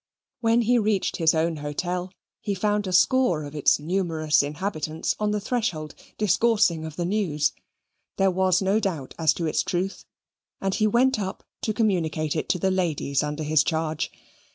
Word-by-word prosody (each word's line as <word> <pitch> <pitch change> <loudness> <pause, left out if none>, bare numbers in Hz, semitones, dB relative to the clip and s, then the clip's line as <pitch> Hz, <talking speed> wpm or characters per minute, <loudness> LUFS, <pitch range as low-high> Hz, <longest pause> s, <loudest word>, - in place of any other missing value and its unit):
When 230 0 +3
he 240 +2 +3
reached 210 -3 0
his 160 -1 +3
own 160 0 0
hotel, 175 +5 -3 0.3
he 205 -2 -2
found 205 +1 0
a - - -2
score 185 - +3
of 145 0 -8
its 150 -2 +3
numerous 160 -2 +1
inhabitants 155 +1 -3
on 210 0 +1
the 210 0 0
threshold 195 - -2 0.2
discoursing 210 -4 +2
of 160 -1 -7
the 175 - -2
news; 170 -7 0 0.7
there 195 0 +3
was 185 0 +2
no 195 +3 +2
doubt 170 -11 -3
as 160 -2 +4
to 170 - -2
its 155 - +1
truth. 185 +2 -3 0.5
And 195 0 -1
he 215 +1 +2
went 245 +2 +3
up 190 -2 -4 0.2
to 220 - -1
communicate 165 -9 0
it 155 - -3
to - - +2
the 190 +2 +1
ladies 160 -7 0
under 150 +1 -3
his 155 0 +3
charge. 160 -1 -2
180 Hz, 175 wpm, -25 LUFS, 155-205 Hz, 0.7 s, as